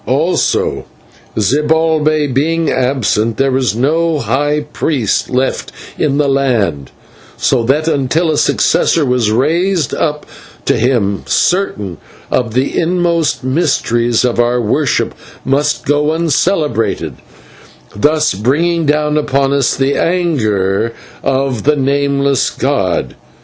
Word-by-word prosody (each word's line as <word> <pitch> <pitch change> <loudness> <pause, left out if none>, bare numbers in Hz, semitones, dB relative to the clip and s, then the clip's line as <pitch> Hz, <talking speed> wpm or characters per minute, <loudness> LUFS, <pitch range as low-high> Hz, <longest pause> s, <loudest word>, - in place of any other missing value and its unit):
"Also, 150 +9 0 0.5
Zibalbay 155 +6 +1
being 160 +4 0
absent, 115 -4 0
there 135 0 +1
was 130 -5 0
no 160 +6 +1
high 145 +1 0
priest 145 -5 -1
left 130 +1 -1 0.2
in 140 -2 0
the 145 -1 +2
land, 115 - 0 0.5
so 130 - +1
that 150 +6 +1
until 160 +2 +1
a 150 - -1
successor 160 -3 +2
was 125 -4 +1
raised 165 - +1
up 150 -2 -2 0.4
to - - +2
him, 110 -5 0
certain 105 - 0 0.3
of 120 -3 -1
the 130 +2 0
inmost 170 -4 0
mysteries 120 -5 +1
of 120 -1 -1
our 120 +1 +2
worship 120 +4 0 0.3
must 145 +3 0
go 145 +1 +1
uncelebrated, 160 - 0 0.8
thus 155 +6 +2
bringing 155 - 0
down 150 +1 +1
upon 140 -1 0
us 140 -3 +1
the 135 +1 +1
anger 115 - 0 0.3
of 135 -3 -1
the 150 +1 +2
Nameless 140 -1 +1
god. - - -1
140 Hz, 115 wpm, -14 LUFS, 125-155 Hz, 0.8 s, the